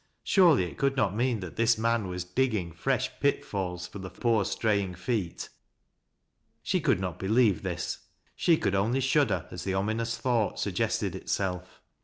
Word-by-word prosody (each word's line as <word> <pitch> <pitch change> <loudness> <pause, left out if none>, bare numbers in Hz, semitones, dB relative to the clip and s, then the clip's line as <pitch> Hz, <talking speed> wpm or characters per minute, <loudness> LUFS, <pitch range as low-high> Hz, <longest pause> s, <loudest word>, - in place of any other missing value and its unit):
Surely 170 - +5
it 90 - -7
could 140 0 +1
not 105 -7 +1
mean 120 -2 0
that 90 -2 -8
this 115 0 +3
man 115 -2 +1
was 90 -1 -4
digging 100 -2 -1
fresh 85 - -1
pitfalls 90 -3 -1
for 100 - -9
the 95 0 -6
poor 115 -2 +1
stray 105 0 +1
ing 95 -2 -5
feet. 90 -1 -3 1.1
She - - 0
could - - +2
not 90 -3 -4
believe 105 -1 +3
this, - - -3 0.2
— - - -46
she 165 -2 +3
could 95 - 0
only 110 +7 +1
ahuider 135 - +2
a - - -21
5 90 - -6
the 95 -1 -1
ominous 110 +4 -1
thought 120 -5 0
suggested - - -1
itself. 90 -2 -3
105 Hz, 175 wpm, -28 LUFS, 90-120 Hz, 1.1 s, Surely